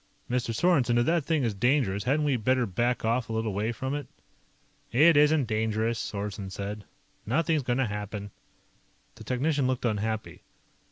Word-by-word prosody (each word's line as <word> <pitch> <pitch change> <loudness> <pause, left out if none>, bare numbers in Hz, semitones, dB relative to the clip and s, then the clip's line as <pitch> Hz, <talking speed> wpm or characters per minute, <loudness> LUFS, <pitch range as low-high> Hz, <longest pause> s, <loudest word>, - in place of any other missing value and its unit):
Mr. 125 -1 -1
Sorensen, 125 -3 +2
if 120 - +3
that 165 -3 +1
thing 160 -4 +1
is 115 -3 0
dangerous, 105 -3 +1
hadn't 145 +4 +2
we 140 -3 +2
better 125 +2 +1
back 120 +5 -1
off 115 +1 0
a - - -3
little 110 -2 -1
way 105 +4 -1
from 130 +4 -4
it?" 145 -2 -4 0.8
"It 150 +8 +6
isn't 150 -1 +4
dangerous," 110 0 -1
Sorensen 100 -1 -4
said. 100 +2 -5 0.4
"Nothing's 155 +6 +1
going 125 -1 -1
to 135 - +2
happen." 105 -1 -5 0.8
The 110 - -12
technician 135 +4 0
looked 130 -1 -1
unhappy. 110 0 -2
120 Hz, 165 wpm, -27 LUFS, 110-135 Hz, 0.8 s, It